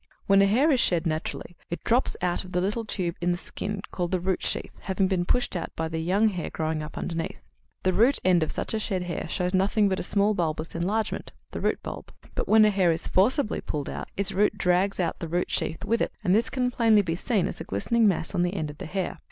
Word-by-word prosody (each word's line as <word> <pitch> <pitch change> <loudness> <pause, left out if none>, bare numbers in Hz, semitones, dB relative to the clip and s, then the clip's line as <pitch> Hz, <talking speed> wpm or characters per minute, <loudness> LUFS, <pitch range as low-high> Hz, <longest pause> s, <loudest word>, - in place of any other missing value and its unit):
When 195 0 +5
a 200 - +5
hair 260 +10 +4
is 260 - +3
shed 175 -5 +2
naturally, 160 +2 -3
it 170 - -5
drops 245 +3 +2
out 175 -1 0
of 185 - -11
the 180 - +2
little 210 +5 -1
tube 180 -5 -2
in 175 0 +2
the 175 - 0
skin 200 +2 -5
called 175 -2 -2
the 185 - 0
root 185 +1 -1
sheath, - - -2
having 190 0 0
been 185 -2 0
pushed 245 +1 0
out 170 - -3
by 160 - -2
the 160 0 -3
young 195 +7 +3
hair 180 -5 -4
growing 155 0 -2
up 150 - -8
underneath; 165 -1 -4 0.4
the 185 - +2
root 240 +8 +4
end 180 -2 +5
of 160 - 0
such - - -3
a 220 - 0
shed 190 -4 -2
hair 170 -2 -4
shows 180 +2 -1
nothing 200 +2 +3
but 190 - -1
a - - -1
small 200 +3 +2
bulbous 160 -3 -2
enlargement 200 +6 -2 0.2
the - - -5
root - - 0
bulb. - - -7 0.2
But - - -2
when 215 0 +6
a 210 - +4
hair 190 -4 +3
is 165 +1 -3
forcibly 220 +6 +2
pulled 145 -2 -4
out, - - -6
its 200 -1 0
root 205 +2 +2
drags 185 +2 +2
out 170 -3 -1
the 165 - -4
root 175 +2 -1
sheath 160 - -2
with 230 0 +1
it, - - 0
and 180 -3 +3
this 225 +3 +3
can 250 -1 0
be 250 - -13
plainly 210 -7 +4
seen 195 +2 0
as - - -6
a - - -3
glistening 225 - +1
mass 175 -4 +1
on 175 - +1
the 175 +2 0
end 155 -5 -2
of 150 - -16
the - - -6
hair. 185 +2 -3
185 Hz, 255 wpm, -26 LUFS, 170-210 Hz, 0.4 s, when